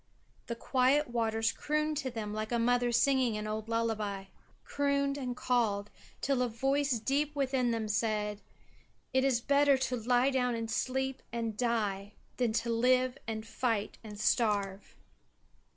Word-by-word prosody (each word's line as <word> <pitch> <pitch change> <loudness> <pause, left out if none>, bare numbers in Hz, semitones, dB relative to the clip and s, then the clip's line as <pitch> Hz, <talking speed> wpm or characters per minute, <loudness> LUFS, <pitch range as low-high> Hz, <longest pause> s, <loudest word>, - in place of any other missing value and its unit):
The 235 - -3
quiet 265 +4 +2
waters 225 -1 +1
crooned 305 0 -1
to 270 -3 -2
them 220 -4 -5
like 215 +1 -4
a 240 - +2
mother 245 +1 +2
singing 245 -2 +3
an 210 - -4
old 215 +1 -4
lullaby 215 -4 -1 0.4
crooned 280 -1 0
and 250 -3 -4
called, 210 -5 0 0.3
till 270 -2 +1
a 250 - +2
voice 270 +3 +1
deep 285 +6 0
within 265 -3 +1
them 225 -2 -1
said, 210 -1 -1 0.7
"It 260 0 +3
is 260 -3 +2
better 280 +1 +4
to 260 -1 -1
lie 245 +3 +2
down 250 -2 +1
and 225 -1 -4
sleep 265 +3 -1
and 230 -2 -3
die 210 -4 -1 0.2
than 245 -3 +1
to 235 - -1
live 255 +2 +2
and 220 -1 -4
fight 225 -3 -2
and 210 -2 -9
starve." 205 -3 0
240 Hz, 150 wpm, -31 LUFS, 220-265 Hz, 0.7 s, better